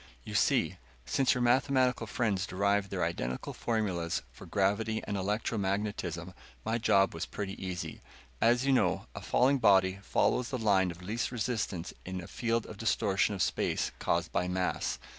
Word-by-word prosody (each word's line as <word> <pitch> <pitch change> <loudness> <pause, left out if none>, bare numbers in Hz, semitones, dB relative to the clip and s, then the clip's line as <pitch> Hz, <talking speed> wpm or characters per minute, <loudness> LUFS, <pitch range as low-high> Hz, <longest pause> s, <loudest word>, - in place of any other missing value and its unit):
"You - - -8
see, - - +2 0.3
since 135 -3 +2
your 125 - 0
mathematical 125 -1 +2
friends 100 -5 0
derived 100 +1 +1
their - - -1
identical 65 +1 -3
formulas 95 -8 -1
for - - -12
gravity 105 +3 0
and 100 - -3
electromagnetism, 100 -3 -2 0.3
my 115 +1 0
job 95 -3 +3
was 80 +2 -4
pretty 100 -2 -4
easy. 90 -2 -5 0.4
As 120 +3 +4
you 135 - +4
know, 130 - +2
a - - -7
falling 135 +2 +3
body 95 -4 +4
follows 125 +4 +1
the 130 - -2
line 100 -5 +3
of 85 +1 -8
least 110 +7 -2
resistance 110 -7 -2
in 95 0 -5
a 85 - -7
field 115 -1 -1
of 110 - -9
distortion 105 -2 +1
of 95 - +1
space - - 0
caused 85 0 0
by 90 +1 0
mass. 90 -9 -1
100 Hz, 160 wpm, -31 LUFS, 95-115 Hz, 0.4 s, As